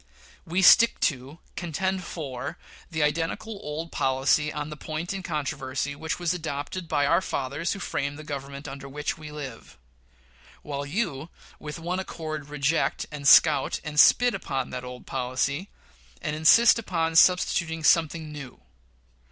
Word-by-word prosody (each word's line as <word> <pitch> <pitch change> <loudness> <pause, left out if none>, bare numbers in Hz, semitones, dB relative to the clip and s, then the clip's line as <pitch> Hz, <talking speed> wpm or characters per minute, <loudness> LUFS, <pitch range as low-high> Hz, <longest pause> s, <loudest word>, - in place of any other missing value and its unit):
We 180 +4 0
stick 230 +5 +7
to, 135 +3 -1 0.2
contend 185 +2 -2
for, 140 -6 -6 0.3
the 160 -3 -1
identical 165 +8 -2
old 155 +3 -5
policy 135 +3 +1
on 150 0 -5
the - - -5
point 155 +4 -5
in 195 - -4
controversy 140 -4 -3
which 160 +2 -3
was 175 -1 0
adopted 160 +1 -5
by 145 -2 +1
"our 170 +5 +3
fathers 140 +1 -2
who 200 - -7
framed 140 -5 -3
the 155 - -9
Government 140 0 -6
under 135 0 -8
which 150 +3 -4
we 150 -1 -9
live"; 140 -6 -9 0.9
while 145 -1 -4
you 160 -4 -2 0.3
with 150 0 -7
one 175 +3 -3
accord 155 -5 -6
reject, 150 +2 0
and 145 -2 -3
scout, 145 -3 +6
and 150 -1 -2
spit 245 +8 +6
upon 135 -2 -3
that 125 0 -5
old 125 0 -9
policy 135 +7 -2 0.5
and 150 - -3
insist 220 +10 +6
upon 165 -6 -1
substituting 165 -2 +3
something 160 -1 +2
new. 140 -4 -9
150 Hz, 150 wpm, -26 LUFS, 140-170 Hz, 0.9 s, stick